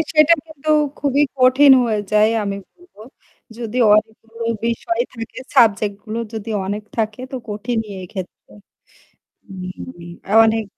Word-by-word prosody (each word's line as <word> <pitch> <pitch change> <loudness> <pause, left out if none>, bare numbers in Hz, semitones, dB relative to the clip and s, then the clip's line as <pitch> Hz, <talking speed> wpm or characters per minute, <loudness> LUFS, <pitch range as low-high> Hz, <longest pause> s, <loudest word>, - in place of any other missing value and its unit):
সেটা 305 +1 +5
কিন্তু 310 -1 -10 0.3
খুবই 285 0 +1 0.2
কঠিন 260 +2 +6
হয়ে 215 -3 0
যায় 215 +1 +5 0.2
আমি 200 -1 -3
বলবো। 355 - -22 0.6
যদি 235 -1 -6 0.2
অনেকগুলো 225 +1 -2 0.2
বিষয় 230 0 -1
থাকে 230 +1 -8 0.2
সাবজেক্ট 215 -5 +4
গুলো 215 +1 -4 0.2
যদি 220 +1 -5 0.2
অনেক 205 +2 -3
থাকে 215 +1 -2
তো - - -3
কঠিনই 220 +1 -3
এক্ষেত্রে। 185 0 -9 1.0
উম 185 -1 -8 0.3
অনেক 225 0 +1
225 Hz, 125 wpm, -19 LUFS, 210-255 Hz, 1.0 s, কঠিন